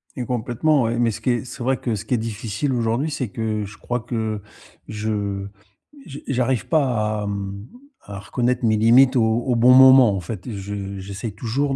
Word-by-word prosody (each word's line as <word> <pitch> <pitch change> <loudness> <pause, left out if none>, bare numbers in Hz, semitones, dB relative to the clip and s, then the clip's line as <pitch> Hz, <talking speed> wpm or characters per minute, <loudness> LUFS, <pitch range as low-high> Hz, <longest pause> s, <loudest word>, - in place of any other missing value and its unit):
Et 125 - -4
complètement, 125 +5 0
oui, 115 +1 -1
mais 120 -1 +2
ce - - -8
qui - - -1
est 120 +1 -2
c'est 125 0 -8
vrai 130 +1 +1
que 115 -3 -2
ce 100 - -6
qui 125 - -2
est - - +1
difficile 115 +3 -3
aujourd'hui, 120 +5 -1
c'est 135 -6 -3
que 110 0 -3
je 105 +2 -11
crois 120 0 -3
que 110 -3 -3 0.5
je 105 -2 -3 0.6
je 140 -1 -9
j'arrive 125 -2 0
pas 115 -9 0
à, - - -4
mmh, 100 +1 -5 0.3
à 100 -1 -9
reconnaître 120 +6 -1
mes 110 -1 +3
limites 125 +5 +5
au 120 - +4
au 115 +3 +1
bon 120 +2 +5
moment, 130 -4 +7
en - - -2
fait. 95 +5 -7
Je 100 -1 -6
j'essaye 100 +3 -6
toujours 135 +6 -2
115 Hz, 200 wpm, -22 LUFS, 105-125 Hz, 0.6 s, moment